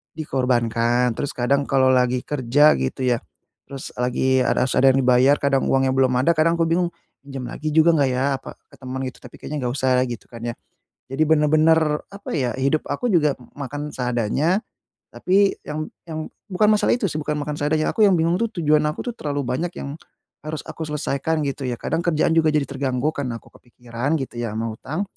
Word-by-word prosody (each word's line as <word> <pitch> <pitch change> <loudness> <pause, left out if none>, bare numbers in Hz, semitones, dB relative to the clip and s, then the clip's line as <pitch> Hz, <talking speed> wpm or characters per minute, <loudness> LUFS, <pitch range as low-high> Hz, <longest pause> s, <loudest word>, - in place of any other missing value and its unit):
dikorbankan. 125 -4 +1
Terus 145 - -3
kadang 140 +3 +1
kalau 130 -1 +3
lagi 125 -1 +2
kerja 145 - +3
gitu 65 - -3
ya, 120 - +2 0.5
terus 135 -1 -8
lagi 130 +1 +1
a - - +2
harus 125 0 +1
ada 135 +1 +5
yang 135 - +2
dibayar, 125 +3 +5
kadang 140 -1 +2
uangnya 135 0 +2
belum 130 -1 +2
ada, 170 - +3
kadang 165 +2 +3
aku 165 -1 +1
bingung, 175 +1 +1 0.3
"Pinjem 135 -3 -6
lagi 155 +1 -4
juga 160 +1 +5
enggak 140 -3 +3
ya," 130 +2 0
apa, - - -10 0.2
"ke - - -15
temen," 130 0 -6
gitu, - - -16
"tapi - - -13
kayaknya 150 - -5
enggak 120 - -1
usah 130 -2 +1
lah," 125 - +2
gitu 120 -2 -8
kan 115 -1 -10
ya. 120 - -2 0.5
Jadi 135 +4 0
benar-benar, 155 +1 +4 0.3
apa 200 0 -9
ya, 125 -4 0
hidup 140 +4 +1
aku 245 +12 -1
juga 155 - +3 0.2
makan 145 +2 -5
seadanya. 125 - 0 0.5
Tapi 195 +2 +2
yang 155 +1 -4 0.2
yang 155 -1 -6 0.2
bukan 210 +3 +3
masalah 210 +2 +3
itu 245 - -2
sih, 155 - -3
bukan 150 0 -2
makan 150 0 -4
seadanya, 155 +1 +1
aku 215 -2 +5
yang 190 - +4
bingung 170 +2 +1
tuh 230 - +2
tujuan 155 -2 +3
aku 150 - -5
tuh - - -14
terlalu 145 -8 -3
banyak 145 +8 -2
yang 140 - -5 0.5
harus 155 0 -4
aku 160 - -5
selesaikan, 150 +1 -1
gitu 140 -1 -3
ya. 125 - -2
Kadang - - -1
kerjaan 155 -2 +2
juga 160 -1 +3
jadi 150 -2 +2
terganggu 135 0 -1
karena 130 -6 -4
aku - - -20
kepikiran 120 +4 -4
gitu 125 -2 -7
ya 115 -3 -3
sama 115 +1 -2
hutang. 150 - -4
140 Hz, 205 wpm, -22 LUFS, 125-155 Hz, 0.5 s, ada